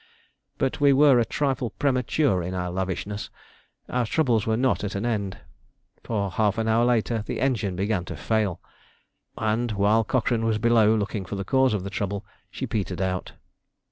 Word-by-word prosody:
But 135 Hz, +2 st, -1 dB
we 140 Hz, -1 st, +6 dB
were 135 Hz, -2 st, +6 dB
a -, -, +4 dB
trifle 130 Hz, -1 st, -1 dB
premature 130 Hz, -, +1 dB
in 90 Hz, +2 st, -4 dB
our 90 Hz, -1 st, -2 dB
lavishness. 95 Hz, +3 st, -3 dB, 0.6 s
Our 125 Hz, -2 st, -1 dB
troubles 120 Hz, -7 st, +1 dB
were 110 Hz, 0 st, +2 dB
not 130 Hz, -2 st, +1 dB
at 100 Hz, -, -3 dB
an 100 Hz, +4 st, -2 dB
end, 105 Hz, -5 st, -2 dB, 0.7 s
for 100 Hz, -4 st, -2 dB
half 105 Hz, +2 st, +1 dB
an 110 Hz, 0 st, -1 dB
hour 115 Hz, +1 st, +3 dB
later 115 Hz, -2 st, +1 dB
the -, -, -3 dB
engine 110 Hz, -8 st, 0 dB
began 100 Hz, 0 st, -1 dB
to 90 Hz, -, -7 dB
fail, 105 Hz, +2 st, 0 dB, 0.8 s
and, 110 Hz, +1 st, 0 dB
while 105 Hz, +3 st, +3 dB
Cochrane 115 Hz, 0 st, 0 dB
was 110 Hz, -1 st, +1 dB
below 110 Hz, -1 st, +4 dB
looking 105 Hz, -1 st, -2 dB
for 95 Hz, +2 st, -6 dB
the 100 Hz, 0 st, -4 dB
cause 130 Hz, 0 st, +3 dB
of 95 Hz, -, -3 dB
the 100 Hz, -, -6 dB
trouble, 100 Hz, 0 st, -3 dB, 0.2 s
she -, -, -5 dB
petered 95 Hz, -4 st, -3 dB
out. 95 Hz, -1 st, -2 dB
110 Hz, 175 wpm, -25 LUFS, 100-120 Hz, 0.8 s, we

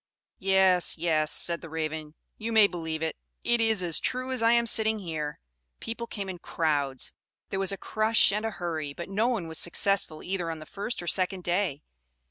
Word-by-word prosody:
"Yes, 190 Hz, -2 st, +4 dB
Yes," 155 Hz, -2 st, +1 dB
said 170 Hz, -1 st, +2 dB
the 165 Hz, -, -9 dB
Raven, 155 Hz, -1 st, -4 dB, 0.2 s
"you 225 Hz, +1 st, -3 dB
may 220 Hz, -2 st, +7 dB
believe 160 Hz, -4 st, -3 dB
it; 160 Hz, -, -2 dB, 0.3 s
it 240 Hz, -1 st, +3 dB
is 220 Hz, -4 st, +2 dB
as 170 Hz, -3 st, +3 dB
true 255 Hz, +1 st, -2 dB
as 255 Hz, -2 st, -1 dB
I 230 Hz, 0 st, +5 dB
am 235 Hz, 0 st, +4 dB
sitting 220 Hz, -1 st, +4 dB
here. 160 Hz, -6 st, -4 dB, 0.4 s
People 235 Hz, +1 st, -5 dB
came 200 Hz, -4 st, -5 dB
in 185 Hz, -2 st, -6 dB
crowds; 145 Hz, -6 st, -1 dB, 0.4 s
there 195 Hz, -, -1 dB
was 195 Hz, 0 st, +1 dB
a 195 Hz, -, -3 dB
crush 215 Hz, 0 st, +3 dB
and 210 Hz, +2 st, -1 dB
a 225 Hz, -, 0 dB
hurry, 160 Hz, -7 st, -4 dB
but 170 Hz, -, -7 dB
no 210 Hz, +4 st, +1 dB
one 225 Hz, -9 st, -1 dB
was 160 Hz, -1 st, -3 dB
successful 175 Hz, -2 st, +1 dB
either 180 Hz, -3 st, -2 dB
on 165 Hz, -, -4 dB
the 155 Hz, -, -10 dB
first 200 Hz, +2 st, -5 dB
or -, -, -8 dB
second 185 Hz, +2 st, +1 dB
day. 175 Hz, -5 st, -1 dB
180 Hz, 200 wpm, -28 LUFS, 160-215 Hz, 0.4 s, may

